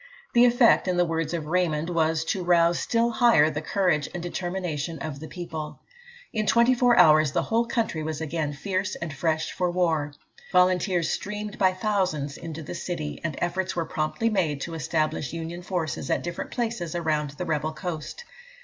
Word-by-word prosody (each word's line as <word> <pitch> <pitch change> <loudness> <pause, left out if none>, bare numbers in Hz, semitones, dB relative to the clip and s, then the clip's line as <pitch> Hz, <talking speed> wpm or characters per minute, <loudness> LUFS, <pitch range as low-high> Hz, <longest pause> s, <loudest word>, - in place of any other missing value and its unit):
The 240 0 +6
effect, 240 -4 +5
in 180 -1 +1
the 175 - +4
words 165 -1 -2
of 165 -3 -3
Raymond, 165 -1 0
was 160 -1 +1
to 185 +2 -1
rouse 170 -1 +3
still 235 0 +1
higher 220 -10 +5
the 150 0 -3
courage 175 -4 +1
and 175 - -4
determination 175 -3 -3
of 150 -3 -6
the 160 - -8
people. 160 -4 -6 0.5
In 215 -1 -1
twenty 235 +5 +5
four 245 -1 +3
hours, 155 -2 +6
the - - +1
whole 230 +1 +1
country 225 -10 -1
was 155 -1 -3
again 160 -1 -2
fierce 190 +6 -2
and 165 -3 -5
fresh 160 +2 -1
for 180 -1 -1
war. 160 -5 0 0.4
Volunteers 180 -1 +3
streamed 210 0 -4
by 190 -2 +4
thousands 185 -8 -1
into 160 -1 -7
the 170 - -6
army, 155 -4 -4
and 160 -2 -2
efforts 185 +2 -1
were 170 -2 -1
promptly 190 +11 -1
made 165 -8 0
to 165 - -4
establish 155 -1 -1
Union 165 +1 -5
forces 175 -4 -3
at - - 0
different 175 0 -5
places 225 -9 -3
around 155 -3 0
the 180 - -3
rebel 155 -1 -1
coast. 160 - -6
170 Hz, 180 wpm, -26 LUFS, 155-190 Hz, 0.5 s, The